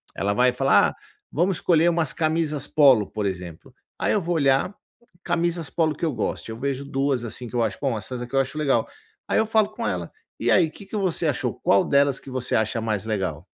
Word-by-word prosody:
ela 100 +1 0
vai 125 +4 +4
falar: 135 +2 +4
"Ah - - -9 0.4
vamos 175 +4 0
escolher 170 -1 +3
umas 165 -4 +1
camisas 155 -3 -1
polo", 135 -8 +5
por 105 -2 -3
exemplo 90 -4 -6 0.3
aí - - +1
eu 210 - +1
vou 175 0 -1
olhar, 140 +4 +2 0.5
camisas 170 -2 -1
polo 160 -2 +1
que 170 - -3
eu 155 - -1
goste, 115 - -3
eu 110 - -7
vejo 140 +1 -2
duas 135 -2 -1
assim 120 +2 -6
que - - -9
eu 120 - +2
acho 110 -4 -2
bom 135 -5 0
essas 120 +4 -6
aqui 125 +2 -8
eu - - +4
acho 135 +3 -2
legal 135 -7 +1 0.4
aí - - +1
eu 220 - +3
falo 220 -1 +2
com 230 +2 -6
ela: - - -3 0.3
"E - - 0
aí 170 -4 +4
que 200 - -12
que 200 - -8
você 180 -4 0
achou, 125 -5 -1
qual 100 - +4
delas 140 -1 +3
que - - -12
você 130 -1 -2
acha 110 +1 0
mais 110 -3 -2
legal?" 105 -4 -3
140 Hz, 225 wpm, -24 LUFS, 120-165 Hz, 0.5 s, polo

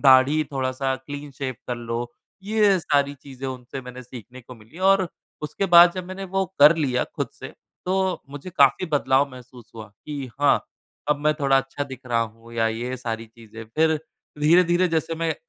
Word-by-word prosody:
दाढ़ी 135 +3 +6
थोड़ा-सा 130 0 -1
clean 145 0 -7
shave 130 -2 -3
कर 125 - -2
लो।" 115 0 -4 0.4
ये 210 -2 +3
सारी 145 -2 +1
चीज़ें 135 -1 -9
उनसे 130 +1 -7
मैंने 125 0 -9
सीखने 125 0 -11
को 125 +1 -12
मिली 115 +9 -16
और 190 -1 +3 0.3
उसके 175 +6 -2
बाद, 175 -1 +8
जब 185 -1 -4
मैंने 195 +1 -6
वो 195 +1 -1 0.2
कर 150 +3 +8
लिया 130 -6 0
खुद - - -2
से, - - -9 0.4
तो 190 0 0
मुझे 145 +5 -8
काफ़ी 140 0 +3
बदलाव 135 0 +2
महसूस 125 -2 -14
हुआ 110 -2 -9 0.2
कि, 140 -4 -6
"हाँ, 145 - +4 0.5
अब 150 - +3
मैं 155 - +4
थोड़ा 135 -1 +4
अच्छा 135 +2 -4
दिख 130 -3 -9
रहा 115 -1 +1
हूँ" 115 +1 -6
या 115 -1 +2
ये 120 +3 -3
सारी 115 -2 -5
चीज़ें। 115 0 -12
फिर 160 0 +3 0.4
धीरे-धीरे 175 +3 +4
जैसे 165 0 -1
मैं 165 -1 -1
140 Hz, 180 wpm, -24 LUFS, 125-165 Hz, 0.5 s, बाद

